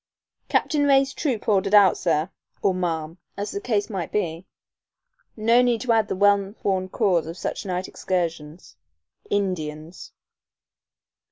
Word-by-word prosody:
"Captain 290 -3 +1
Ray's 270 -1 +4
troop 255 -9 -2
ordered 200 -1 +3
out, 200 -3 +7
sir," 160 +1 0 0.3
or 195 - +3
"ma'am," 165 -2 -3 0.2
as 205 +1 -3
the 405 - -4
case 210 - 0
might 190 -7 -5
be. 175 -3 -2 0.9
No 230 +3 +4
need 245 -2 +1
to 250 -1 0
add 220 -2 +3
the - - -2
well 200 +1 +2
worn 185 -1 0
cause 180 -7 +1
of 165 +2 -7
such - - -4
night 180 0 -2
excursions 170 -3 -4 0.5
"Indians." 165 -5 -3
195 Hz, 140 wpm, -24 LUFS, 170-215 Hz, 0.9 s, out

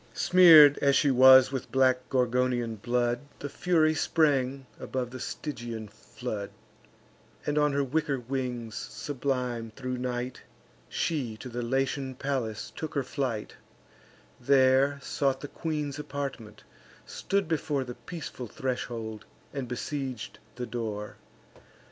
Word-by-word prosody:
Smear'd 160 -6 +8
as 140 -1 +3
she 145 -1 +4
was 130 0 +8
with 130 -3 -4
black 130 0 +2
Gorgonian 125 -2 +1
blood, 120 +2 0 0.2
The 145 - -6
Fury 160 -1 +2
sprang 140 -4 +1
above 125 -2 -4
the 130 - -7
Stygian 120 -6 -5
flood; 105 -1 -6 1.0
And 150 0 +1
on 150 -1 +2
her 140 0 +1
wicker 140 0 -1
wings, 125 -2 -4
sublime 125 -5 -3
thro' 130 -2 -5
night, 125 0 -3 0.5
She 130 -9 -2
to 125 - -8
the 120 0 -4
Latian 135 +2 -1
palace 125 -6 -3
took 160 -1 -6
her 140 - +1
flight: 125 -5 -3 0.8
There 135 +2 +4
sought 135 -2 0
the 145 - -5
queen's 150 -2 -4
apartment, 135 -7 -6 0.4
stood 200 -3 -1
before 150 -3 -1
The 125 -1 -7
peaceful 125 0 -7
threshold, 115 -3 -4 0.3
and 135 -3 -4
besieg'd 130 -1 -5 0.2
the 125 0 -4
door. 110 -3 -5
130 Hz, 125 wpm, -28 LUFS, 120-140 Hz, 1.0 s, Smear'd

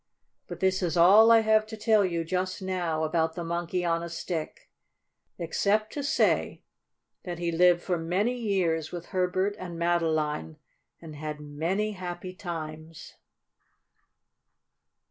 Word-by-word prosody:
But - - -8
this 190 0 +2
is 175 -2 -1
all 200 +7 +7
I 225 -1 +7
have 215 0 +3
to 220 0 -8
tell 215 -1 +3
you 170 -3 -1
just 185 +3 -2
now 175 -4 -2
about 160 0 0
the 175 - -4
Monkey 175 +1 -2
on 165 0 +1
a 170 - -5
Stick, 165 -1 -5 0.7
except 205 +6 0
to 290 - -3
say 285 +3 +1 0.6
that 175 -2 -5
he 170 0 -2
lived 175 +1 +4
for 180 -2 -1
many 185 +9 0
years 180 -9 -1
with 175 -1 -7
Herbert 185 +2 0
and 175 -2 -7
Madeline, 160 -3 0 0.4
and 160 -2 -10
had 150 0 -5
many 165 +9 -2
happy 180 -1 -6
times. 160 -3 -7
175 Hz, 140 wpm, -27 LUFS, 165-190 Hz, 0.7 s, all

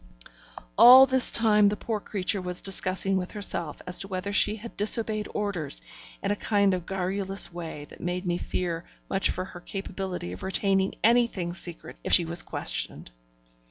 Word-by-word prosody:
All 260 +2 +10
this 260 -1 +2
time 210 -3 +5
the 210 - -2
poor 225 -2 -3
creature 195 -1 -2
was 180 0 -5
discussing 190 0 0
with 180 -1 -5
herself 170 -7 -2
as 180 0 +1
to 195 - -2
whether 195 +1 -4
she 210 +1 +3
had 225 +2 -10
disobeyed 215 0 +2
orders, 180 - -2 0.4
in - - 0
a - - +1
kind 200 -2 +1
of 180 -2 -4
garrulous 195 0 0
way 165 -4 -7
that - - -15
made 180 +2 -3
me 175 0 -1
fear 170 -2 -3 0.3
much 195 - +1
for 185 - -3
her 180 -2 -11
capability 190 - -6
of 90 - -9
retaining 195 0 0
anything 230 -7 +2
secret 175 -2 -7
if - - -1
she 175 - +6
was 170 +1 0
questioned. - - -4
190 Hz, 170 wpm, -26 LUFS, 180-205 Hz, 0.4 s, All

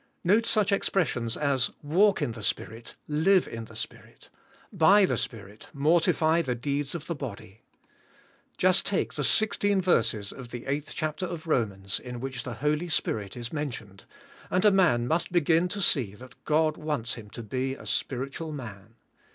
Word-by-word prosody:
Note 210 +6 +3
such 210 -2 +2
expressions 140 - 0
as 140 -4 +1
"Walk 190 +7 +3
in - - -1
the 115 -1 -8
Spirit," 115 +2 -4
"Live 170 +5 +3
in 115 -1 -6
the 110 - -14
Spirit," 115 0 -9 0.3
" 270 -4 -28
By 205 0 +7
the - - 0
Spirit, 105 -3 -6
mortify 160 +2 +3
the 125 -6 -2
deeds, 140 +4 -2
of 160 - -6
the 170 - -3
body." 110 - -8 1.0
Just 185 +1 +4
take 200 - -1
the 145 - -3
sixteen 205 +3 +3
verses 115 - +1
of 125 -3 -10
the 120 -1 -7
eighth 145 +2 -3
chapter 155 +4 -2
of 170 -2 -6
Romans 100 -10 0
in 125 -1 -7
which 135 0 -4
the 125 - -6
Holy 150 +4 +1
Spirit 105 -9 -2
is 120 +2 -6
men 150 -1 -1
tioned, 100 -5 -10 0.5
and 185 +3 +1
a 210 - +7
man 165 -12 +3
must 165 +5 0
begin 170 0 +3
to 200 +2 -4
see 125 - +2
that 125 +3 -13
God 155 0 +2
wants 150 -7 -2
him 105 -3 -9
to 120 - -8
be 130 +4 -2
a - - -13
spiritual 135 +5 -3
man. 115 -6 -9
140 Hz, 175 wpm, -27 LUFS, 115-170 Hz, 1.0 s, By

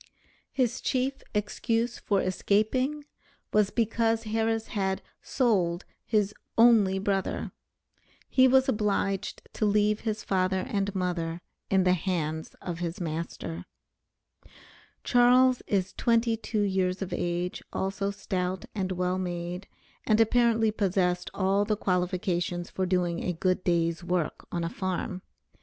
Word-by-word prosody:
His 255 -2 0
chief 265 +1 -1
excuse 225 +3 -1
for 200 -2 +1
escaping, 255 +10 0 0.5
was 210 -2 +4
because 225 0 +1
Harris 225 0 -1
had 190 -3 -1 0.2
"sold" 190 -8 +1 0.2
his 210 -2 +1 0.2
"only 225 -5 +6
brother." 195 0 -1 0.8
He 260 -1 +5
was 265 +1 +4
obliged 205 -4 -1
to 215 - 0
leave 210 +1 +2
his 215 -2 -3
father 185 0 +1
and 200 -1 -1
mother 175 -3 -2 0.3
in 190 -1 +3
the 180 0 +4
hands 160 -3 -2
of 170 -2 -4
his 175 +2 -3
master. 155 - -4 1.4
Charles 250 +1 +5
is 190 -2 0
twenty 230 -1 +2
two 215 -1 -2
years 190 -1 0
of 185 - -6
age, 175 +1 -2
also 195 +1 -2
stout, 185 -2 -3
and 190 -3 -2
well 180 +1 -1
made, 175 +1 -4 0.4
and 215 0 +4
apparently 225 -1 +3
possessed 180 -4 0
all 195 +1 +1
the 210 0 0
qualifications 180 -2 -1
for 185 -1 -1
doing 175 -2 0
a 180 - -1
good 185 +2 0
day's 170 0 +1
work 175 -3 -2
on 170 -1 -2
a 165 - -1
farm. 185 0 -3
195 Hz, 130 wpm, -28 LUFS, 180-220 Hz, 1.4 s, only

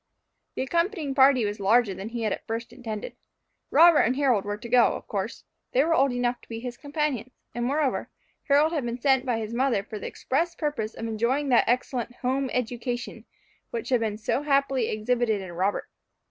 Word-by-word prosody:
The - - -1
accompanying 335 0 -1
party 265 -3 +5
was 205 0 -3
larger 210 +1 +3
than 195 +3 -6
he 235 0 -4
had 215 - +1
at - - -8
first 230 +1 -4
intended. 220 -4 -6 0.5
Robert 330 +1 +7
and 250 - +3
Harold 255 -8 +2
were 205 0 -3
to 235 +3 -9
go 245 0 +4
of - - -9
course; - - -4 0.3
they 260 - +4
were 325 +2 +2
old 275 -3 +3
enough 245 0 -1
to - - -21
be 225 -1 -5
his 245 0 -6
companions; 285 -4 -2 0.2
and, 240 +1 -3
moreover, 280 +1 0 0.4
Harold 295 +3 +4
had 300 -5 -1
been 240 +1 -3
sent 265 0 +2
by 240 -2 +1
his 220 0 -4
mother 245 -4 +1
for 215 0 -7
the - - -5
express 335 +6 -1
purpose 285 -8 -3
of 225 - -5
enjoying 235 +6 0
that 245 - +5
excellent 245 0 -1
home 260 +2 -1
education 245 0 -3 0.4
which 460 -7 -5
had 250 -2 +3
been 215 -2 -2
so 220 +5 -1
happily 275 -4 +1
exhibited 220 0 0
in 190 -2 -7
Robert. 190 +4 -1
245 Hz, 200 wpm, -26 LUFS, 225-275 Hz, 0.5 s, Robert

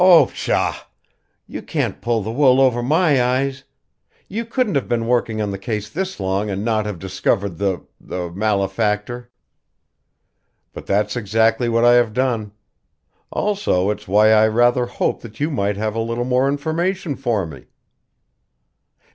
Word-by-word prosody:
"Oh, 180 -3 +8
pshaw! - - -2 0.6
You - - -7
can't - - -3
pull 115 -2 0
the 110 - -4
wool 130 +1 +4
over 125 -3 +3
my 150 +1 +3
eyes! 135 +2 -1 0.6
You 225 +4 -4
couldn't 235 -3 -1
have 140 - 0
been 115 -1 0
working 115 -2 0
on 105 -1 -1
the 95 - -5
case 105 +1 -4
this 190 - -4
long 95 +2 -1
and 100 +1 -3
not 110 -2 0
have 105 -4 -4
discovered 95 0 -1
the 100 -2 -1
the 90 -2 -5
malefactor." 105 +4 -1 1.4
"But - - -10
that's 105 +1 0
exactly 115 +2 +1
what 115 +1 +2
I 120 - +7
have 120 -3 +3
done. 115 -4 -1 0.8
Also 195 - 0
it's 105 0 -7
why 105 +3 +5
I 110 0 +5
rather 120 +2 +2
hoped 120 - -2
that 115 -1 -12
you 150 +3 0
might 100 -6 -1
have 110 0 -2
a 115 - -3
little 115 +2 -2
more 130 +1 +2
information 160 +4 -1
for 120 -8 -1
me." 70 -6 -11
115 Hz, 155 wpm, -20 LUFS, 105-130 Hz, 1.4 s, Oh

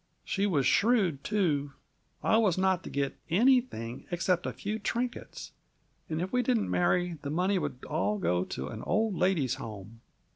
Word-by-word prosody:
"She 200 0 0
was 145 -9 +1
shrewd, 200 - +3
too. 150 -9 0 0.5
I 220 - +4
was 205 -6 +3
not 185 -1 +2
to - - -7
get 140 -1 -2
anything 205 - +2
except 175 0 0
a - - -1
few 215 +2 -4
trinkets. 240 +4 -4 0.6
And 155 0 -2
if 185 +5 -3
we 250 - +3
didn't 240 -3 +1
marry, 175 -2 +1
the 140 - -4
money 185 +5 +1
would 140 -5 -5
all 170 +7 0
go 90 - +1
to 65 +1 -5
an 110 - -7
old 220 0 +1
ladies' 170 -9 +1
home. 110 +1 -9
180 Hz, 170 wpm, -29 LUFS, 140-210 Hz, 0.6 s, I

